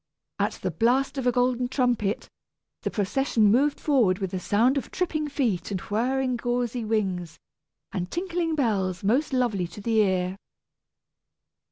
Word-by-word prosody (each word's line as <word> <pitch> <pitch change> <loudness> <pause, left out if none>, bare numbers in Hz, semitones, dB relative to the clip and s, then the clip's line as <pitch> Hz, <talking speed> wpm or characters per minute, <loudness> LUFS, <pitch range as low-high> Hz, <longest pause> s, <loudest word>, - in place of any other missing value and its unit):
At - - +1
the 185 - -4
blast 250 - +1
of 250 - -1
a - - +5
golden 245 0 +1
trumpet, 245 -5 0 0.5
the - - -1
procession 215 0 +2
moved 280 +5 +2
forward 240 -11 +3
with 190 -1 -4
a 185 - -1
sound 225 +8 +2
of 275 - -2
tripping 320 -5 -1
feet 235 - -1
and 195 -2 -2
whirring 250 +6 0
gauzy 245 0 -1
wings 190 -7 -1 0.6
and 180 -1 -3
tinkling 345 -2 -1
bells 195 - 0
most 255 +10 +2
lovely 235 -9 +1
to 170 +4 -11
the 225 +2 0
ear. 185 -2 +1
235 Hz, 150 wpm, -26 LUFS, 195-265 Hz, 0.6 s, a